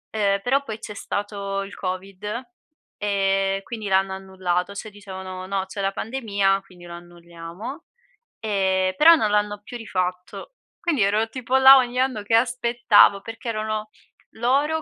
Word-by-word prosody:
ehm, 200 -2 +2
però 270 +5 +1
poi 220 -5 -6
c'è 210 - -8
stato 200 -1 -4
il 195 - -10
covid, 185 +1 -5 0.7
ehm, 195 -1 0
quindi 220 -2 -6
l'hanno 190 0 +2
annullato, 190 -1 -2
cioè 200 +2 -7
dicevano: 190 -2 -8
"No, 190 0 -2
c'è 195 +1 -6
la 195 0 0
pandemia, 200 -4 0
quindi 180 -2 -16
lo 170 - -9
annulliamo". 175 - -9 0.6
Ehm, 190 -3 +1
però 335 +2 +8
non 215 -9 0
l'hanno 210 0 0
più 245 - -8
rifatto. 185 - -4 0.3
Quindi 315 -9 0
ero 210 +3 +1
tipo 255 +2 -3
là 265 +1 +9
ogni 250 -1 0
anno 255 -5 0
che 225 +2 +1
aspettavo 235 -4 +4
perché 225 +3 -9
erano 215 -1 -3 0.4
loro 280 +7 +1
205 Hz, 150 wpm, -23 LUFS, 190-230 Hz, 0.7 s, là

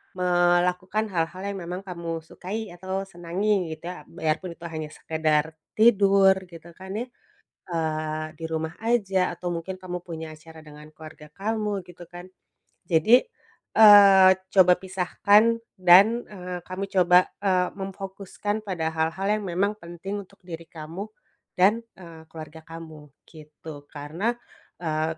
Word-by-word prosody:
melakukan 180 +3 +1
hal-hal 175 0 -2
yang 200 0 -4
memang 180 +2 -5
kamu 170 -3 -5
sukai 200 +7 -6
atau 190 +2 -4
senangi, 185 0 -2
gitu 160 +2 -8
ya. 180 - -9
Biarpun 165 +1 -3
itu, 170 - -29
hanya 155 -2 -5
sekadar 160 0 -1 0.2
tidur, 200 -3 +5
gitu 170 -1 -13
kan 190 0 -8
ya, 240 - -3 0.7
eee, 155 -1 -2
di 165 - -7
rumah 160 0 -3
saja 195 -6 +1
atau 180 - -5
mungkin 185 +3 -5
kamu 180 -1 -6
punya 160 -2 -7
acara 160 +1 -15
dengan 150 0 -13
keluarga 155 -1 -13
kamu, 210 -2 -2
gitu 175 0 -13
kan. 175 0 -10 0.6
Jadi, 175 +10 +4 0.5
eee, 200 -3 +9 0.2
coba 180 -2 +7
pisahkan 205 +4 +2 0.2
dan, 200 +7 +6
eee, 180 -3 -7
kamu 185 +3 -6
coba, 180 -1 +5 0.2
eee, 185 -2 +2
memfokuskan 195 +2 -5
pada 170 -6 -3
hal-hal 160 +4 -1
yang 215 0 -2
memang 195 +4 0
penting 175 +4 -6
untuk 195 -1 -20
diri 165 -2 -9
kamu, 165 +6 -8 0.5
dan, 205 +5 +4 0.2
eee, 170 -3 -12
keluarga 160 0 -10
kamu, 160 -2 -10 0.2
gitu. 150 -2 -12
Karena, 155 +8 -3 0.5
eee, 160 -1 -2
180 Hz, 135 wpm, -25 LUFS, 160-195 Hz, 0.7 s, eee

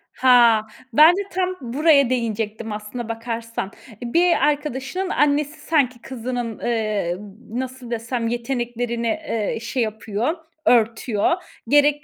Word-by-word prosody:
Ha! 235 -4 +5 0.3
Ben 315 +6 +8
de - - 0
tam 370 0 -1
buraya 280 +2 +3
değinecektim 225 -2 -2
aslına 215 +3 -6
bakarsan. 230 -2 -4 0.2
Eee, 225 - -15 0.2
bir 345 -1 +4
arkadaşının 295 +5 -2
annesi 295 0 +1
sanki 255 -7 +1
kızının, 245 -2 -4
eee, 215 -7 -1 0.3
nasıl 255 0 -5
desem, 230 0 -2
yeteneklerini, 240 -1 -2
eee, 230 -7 -2
şey 235 +1 -1
yapıyor, 220 - -2 0.3
örtüyor. 225 -1 +2 0.4
Gerek 290 +2 +4
240 Hz, 115 wpm, -22 LUFS, 225-285 Hz, 0.4 s, Ben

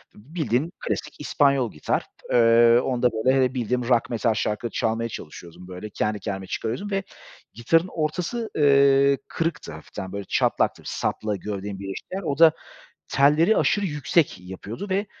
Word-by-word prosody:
Bildiğin 145 +3 -2
klasik - - -4
İspanyol 140 -5 +2
gitar, 75 - -1 0.3
eee, 115 0 +6
onda, 125 -1 +1
böyle, 130 +5 +2
eee, 125 - -2
bildiğim 125 -1 -1
rock, 125 0 +2
metal 115 -1 +1
şarkıları 105 +2 -2
çalmaya 115 +1 -1
çalışıyordum, 85 -1 -10
böyle, 90 +3 -8
kendi 105 +1 -2
kendime 95 -3 -5
çıkarıyordum 125 - -4
ve 195 0 0 0.5
gitarın 165 - +2
ortası, 180 +9 -3
eee, 140 -1 +5
kırıktı 165 - -3
hafiften, 85 +4 -8
böyle, 100 0 -5
çatlaktı, - - +1
sapla 105 -1 -2
gövdenin 100 -1 -5
birleştiği 100 - -7
yer. 195 - -3
O 140 -4 -2
da 165 -1 +8 0.6
telleri 150 +9 +4
aşırı 205 -1 +2
yüksek 150 - +1
yapıyordu 95 - -8
ve 195 +2 0
125 Hz, 145 wpm, -24 LUFS, 105-150 Hz, 0.6 s, da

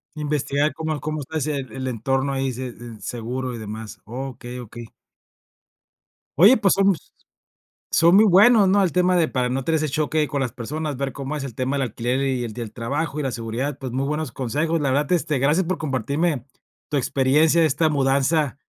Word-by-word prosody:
Investigar 150 -1 0
cómo 155 -1 -3
cómo 155 0 -3
está 160 +4 -5
ese 150 0 -1
el 130 0 -5
entorno 135 +3 -1
ahí, 135 0 -1
se 130 +1 -5
s 120 - -13 0.2
seguro 125 +2 -4
y 115 - -6
demás. 110 0 -7
Okey, 125 +1 -7
okey. 120 -1 -9 1.5
Oye, 205 +9 +8
pues, 200 -7 +3
somos 195 -3 +1 0.8
son 170 +2 +5
muy 215 - +7
buenos, 205 +2 +6
¿no?, 200 +1 +4
el 180 - +1
tema 180 +3 +2
de 170 -3 +2
para 125 -1 0
no 130 +2 -2
tener 160 +4 +1
ese 155 0 -1
choque 150 +1 0
con 140 -1 -2
las 130 -3 -1
personas, 145 +5 -4
ver 135 0 -3
cómo 140 +2 -4
es 140 - -4
el 125 -5 -8
tema 130 +3 -1
del 135 - 0
alquiler, 125 +2 -2
y 130 -2 -1
el 115 - -4
del 115 -1 -7
trabajo 140 +5 -3
y 150 - -1
la 135 - -1
seguridad. 120 +5 -3
Pues 130 -3 -6
muy 130 +2 0
buenos 150 -2 -3
consejos, 150 +6 -1
la 140 - +1
verdad 145 +2 +1
este 155 -5 0
gracias 150 +7 +2
por 185 +1 -1
compartirme 145 -1 -1 0.4
tu 150 - 0
experiencia 145 +5 +3
de 160 - +5
esta 155 +2 +1
mudanza 140 0 +1
140 Hz, 200 wpm, -23 LUFS, 125-155 Hz, 1.5 s, Oye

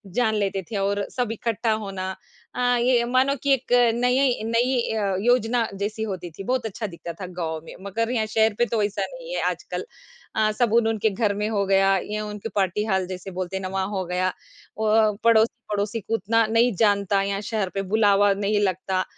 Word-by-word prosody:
जान 225 -3 +2
लेते 195 -2 -1
थे 210 - -2
और 200 +1 0
सब 245 -3 -1
इकट्ठा 230 0 -1
होना। 195 -3 -3 0.4
अ, 245 0 +2
ये 240 0 +3
मानो 260 +3 +2
कि 280 - +4
एक 260 -2 -2 0.2
नई, 250 +1 +2
यई 255 -5 +2
नई 240 +3 +1 0.2
अ, 200 -2 0
योजना 240 0 +2
जैसी 210 +2 -2
होती 185 -5 -4
थी 195 - -6
बहुत 255 +1 -1
अच्छा 215 0 -4
दिखता 170 -1 -8
था - - -3
गाँव 160 -2 -2
में। - - -10
मगर 230 +4 -1
यहाँ 225 -3 +1
शहर 220 0 +2
पे 240 - +4
तो 230 -2 -1
ऐसा 205 -1 -1
नहीं - - -8
है - - -1
आजकल। - - -5 0.5
अ, 215 0 +2
साबुन 230 0 +2
उनके 220 -1 +1
घर 205 0 0
में 210 +1 -1
हो 200 -2 0
गया 195 0 +4
या 215 0 -2
उनकी 210 +1 -6
पार्टी 200 +2 +1
हाल 190 -3 +1
जैसे 185 +1 -7
बोलते 185 +1 -4
हैं - - -5
ना 195 - -2
हो 195 -1 -2
गया 180 +1 0 0.5
और 215 -1 +3
पड़ोसी-पड़ोसी 220 -1 +2
को 205 - -5
उतना 225 +2 +2
नहीं 230 +1 +3
जानता 200 -1 +2
यहाँ 195 0 -2
शहर 210 -3 -2
पे 195 - 0
बुलावा 205 -2 +4
नहीं 205 +1 0
लगता। 185 0 0
215 Hz, 200 wpm, -24 LUFS, 195-230 Hz, 0.5 s, कि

